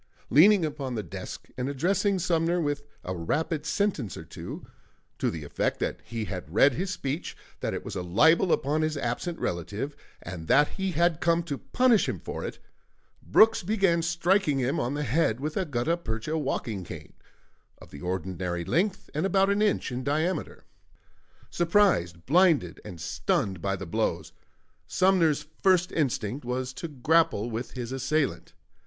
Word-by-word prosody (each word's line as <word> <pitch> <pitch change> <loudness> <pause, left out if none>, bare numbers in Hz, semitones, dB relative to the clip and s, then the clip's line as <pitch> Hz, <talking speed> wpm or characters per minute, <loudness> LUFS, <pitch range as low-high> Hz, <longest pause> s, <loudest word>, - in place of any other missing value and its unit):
Leaning 190 +3 +6
upon 140 -4 -4
the 110 - -2
desk 85 - -8
and 125 +2 -1
addressing 190 +8 +1
Sumner 170 0 +1
with 145 -3 -1 0.2
a 95 - -4
rapid 150 - -2
sentence 185 - -1
or - - -7
two, - - -8 0.5
to - - +1
the 80 -2 -5
effect 75 - -1
that - - -2
he 115 -2 -4
had 90 -6 -6
read 135 +8 +5
his 185 +8 -2
speech, 150 -3 -4 0.2
that - - -2
it - - -6
was - - -6
a - - -2
libel 160 - +4
upon 150 +3 +1
his 155 -1 0
absent 140 +7 -2
relative, 100 - -3 0.3
and 85 -4 -7
that 145 +1 +5
he 190 -1 -3
had 170 0 +2
come 170 0 +2
to 145 -5 -4
punish 250 -4 +3
him - - -3
for - - -6
it, - - -5 0.6
Brooks 225 +1 +5
began 190 -3 +2
striking 175 -1 +2
him 130 0 0
on 125 +4 -1
the 150 - -2
head 130 -3 +1
with 150 +3 -3
a 190 - 0
gutta 145 +2 0
percha 115 0 -3
walking 115 -9 -2
cane, - - -9 0.6
of - - -15
the 70 - -10
ordinary 90 -1 -3
length 190 - 0
and 150 - -1
about 195 0 +3
an 200 +1 +1
inch 210 -9 +1
in 125 +1 -3
diameter. 155 +6 -1 0.9
Surprised, 170 - +2
blinded 160 - +3
and 90 - -9
stunned 95 +2 -1
by 100 0 0
the 95 - -6
blows, 85 - -1 0.6
Sumner's 170 -6 +3 0.2
first 185 -2 +3
instinct 130 -4 -1
was 125 +1 -3
to 170 - -5
grapple 145 -5 +2
with 115 +3 -4
his 125 -2 -5
assailant. 140 +3 -1
145 Hz, 165 wpm, -27 LUFS, 115-175 Hz, 0.9 s, Leaning